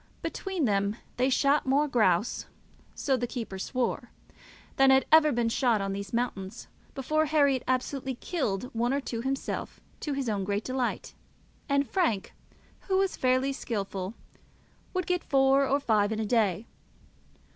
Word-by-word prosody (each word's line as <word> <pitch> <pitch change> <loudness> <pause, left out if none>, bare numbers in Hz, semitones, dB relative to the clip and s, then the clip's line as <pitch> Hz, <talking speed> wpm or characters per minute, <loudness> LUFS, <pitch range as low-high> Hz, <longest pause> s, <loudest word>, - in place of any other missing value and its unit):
Between 380 -6 -2
them 200 -1 +1 0.2
they 255 +2 +2
shot 280 +2 +2
more 285 +3 +3
grouse, 215 -6 +1 0.5
so 270 - +1
the 245 -1 -2
keeper 225 -6 -5
swore, 240 +2 -2 0.7
than 270 0 +6
had 265 -1 +5
ever 310 -1 +7
been 240 -2 +1
shot 230 -1 +2
on 195 0 -2
these 200 0 -5
mountains 225 -3 -3 0.3
before. 310 +3 +1
Herriot 280 -4 +3
absolutely 260 +1 -1
killed 250 - -3
one 240 +3 +1
or - - +1
two 235 -4 -4
himself, 270 +2 -3 0.2
to 295 - -3
his 275 -2 -2
own 205 -3 -1
great 200 +2 -1
delight, 255 -1 -2 0.6
and 280 0 +2
Frank, 230 - 0 0.5
who 380 -1 +2
was 385 0 +1
fairly 255 +2 +1
skilful, 200 -4 -4 0.8
would 370 -2 0
get 360 0 0
four 270 0 +3
or 280 +2 +2
five 215 -6 +2
in 220 - -2
a 220 - -1
day. 210 -3 +1
255 Hz, 155 wpm, -28 LUFS, 220-275 Hz, 0.8 s, ever